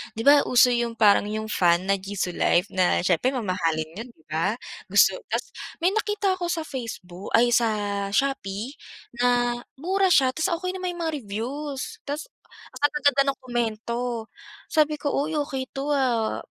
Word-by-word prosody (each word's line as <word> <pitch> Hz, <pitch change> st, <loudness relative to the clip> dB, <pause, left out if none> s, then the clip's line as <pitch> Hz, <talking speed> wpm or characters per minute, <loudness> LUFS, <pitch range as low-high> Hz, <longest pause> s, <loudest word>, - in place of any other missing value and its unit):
'di 225 Hz, -, -3 dB
ba 290 Hz, 0 st, +9 dB
uso 250 Hz, 0 st, +5 dB
yung 235 Hz, -1 st, -1 dB
parang 205 Hz, -1 st, +5 dB
yung 215 Hz, +1 st, -3 dB
fan 175 Hz, 0 st, +3 dB
na 195 Hz, -, +3 dB
Jisulife 185 Hz, -1 st, 0 dB
na 185 Hz, -1 st, +2 dB
siyempre 190 Hz, +8 st, +2 dB
mamahalin 165 Hz, -8 st, -1 dB
yun, -, -, -13 dB
'di 160 Hz, -, -29 dB
ba, 170 Hz, +8 st, 0 dB, 0.3 s
gusto -, -, +4 dB
tapos -, -, -1 dB, 0.4 s
may 360 Hz, -, +4 dB
nakita 415 Hz, -3 st, 0 dB
ako 350 Hz, -, -2 dB
sa 325 Hz, -3 st, -2 dB
Faceboo 200 Hz, -8 st, -7 dB
ay, 240 Hz, +1 st, +4 dB
sa 235 Hz, -1 st, +4 dB, 0.4 s
Shopee 245 Hz, -1 st, -1 dB, 0.4 s
na 245 Hz, 0 st, +3 dB, 0.3 s
mura 380 Hz, +5 st, +2 dB
siya 265 Hz, -6 st, +5 dB
tapos 320 Hz, +6 st, -1 dB
okey 365 Hz, -, -1 dB
naman 365 Hz, -1 st, -3 dB
yung 345 Hz, -, -4 dB
mga 320 Hz, -1 st, -1 dB
reviews, 260 Hz, +6 st, -4 dB, 0.2 s
tapos 295 Hz, +10 st, -4 dB, 0.3 s
ang 285 Hz, +3 st, -2 dB
gaganda 280 Hz, -1 st, +5 dB
ng -, -, -29 dB
komento, 235 Hz, -1 st, -3 dB, 0.4 s
sabi 305 Hz, -1 st, +3 dB
ko, 290 Hz, -, 0 dB
"Uy 300 Hz, +3 st, -1 dB
okey 265 Hz, -2 st, -3 dB
'to 275 Hz, +2 st, -3 dB
ah, 245 Hz, -6 st, +1 dB
245 Hz, 165 wpm, -25 LUFS, 210-290 Hz, 0.4 s, ba